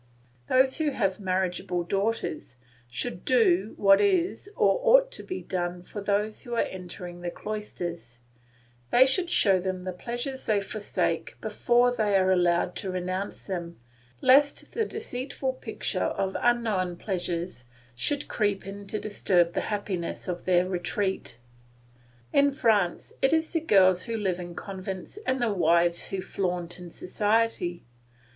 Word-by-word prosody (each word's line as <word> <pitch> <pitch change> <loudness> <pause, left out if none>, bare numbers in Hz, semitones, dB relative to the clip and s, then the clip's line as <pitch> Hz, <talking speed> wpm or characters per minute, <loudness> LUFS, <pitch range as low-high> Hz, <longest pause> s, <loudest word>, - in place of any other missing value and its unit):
Those 260 +3 +3
who 310 -1 +2
have 195 -8 -1
marriageable 185 -1 -1
daughters 195 - -2 0.3
should 125 +8 -3
do 210 -5 +3
what 195 -1 +6
is 380 0 +1
or - - +3
ought - - +5
to - - -5
be 370 - -6
done 175 -1 -3
for 205 +3 -7
those 205 +2 0
who 240 -1 -5
are - - +3
entering 180 -1 -8
the 175 - -3
cloisters: 175 - -6 0.7
they 255 +2 +6
should 340 +7 +1
show 195 - +4
them 185 0 -3
the 185 - -3
pleasures 240 +8 -4
they 210 -2 +3
forsake 205 +1 -2
before 245 0 +2
they 210 -3 +1
are 190 0 +3
allowed 175 -1 +2
to 195 - -4
renounce 185 +2 -3
them, 170 - -5 0.4
lest 280 +2 +4
the 450 - 0
deceitful 270 - -3
picture - - -2
of 190 0 -2
unknown 220 -7 +1
pleasures 175 - -3 0.3
should 280 - -2
creep 205 -3 -1
in 200 +1 -8
to 215 +2 -3
disturb 180 -4 +1
the - - 0
happiness 200 -5 -3
of 175 -1 -4
their 180 0 +3
retreat. 190 - -2 1.0
In 280 0 +5
France 210 -9 +1
it 270 +3 +3
is 320 0 +1
the 330 - +2
girls 185 - +4
who 230 -1 -2
live 190 -4 -1
in 175 -1 -7
convents 190 - -6
and 260 0 +1
the 235 -3 +1
wives 170 -2 +3
who 195 -1 -3
flaunt 180 -2 -3
in 175 -1 -9
society. 205 -2 0
195 Hz, 150 wpm, -27 LUFS, 180-235 Hz, 1.0 s, what